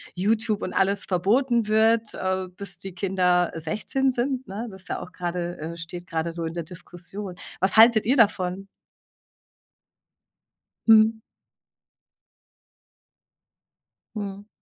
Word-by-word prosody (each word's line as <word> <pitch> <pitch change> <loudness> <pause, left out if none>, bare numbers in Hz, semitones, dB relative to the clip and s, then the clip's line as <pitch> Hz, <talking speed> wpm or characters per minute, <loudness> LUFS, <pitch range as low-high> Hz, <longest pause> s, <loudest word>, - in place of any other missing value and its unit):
YouTube 215 +2 +1
und 185 - -4
alles 195 +1 +1
verboten 225 +5 +2
wird, 220 +1 +3
äh, 185 0 -2
bis 195 -3 -2
die 195 -1 -6
Kinder 180 -2 +1
16 215 +11 -1
sind, 255 +1 -2
ne? 210 +5 -5
Das 190 -1 -11
ja - - -3
auch 180 - -9
gerade, 175 -1 -4
äh 165 +2 -6
steht 175 +1 -7
gerade 165 0 -2
so 165 -1 -3
in 160 - -4
der 170 -1 -4
Diskussion. 180 +3 -7 0.3
Was 195 +3 +1
haltet 225 -1 +7
ihr 265 - +4
davon? 195 -4 +2 2.2
Mhm. 220 0 +6 3.0
Mhm. 200 0 -6
195 Hz, 120 wpm, -25 LUFS, 180-220 Hz, 3.0 s, haltet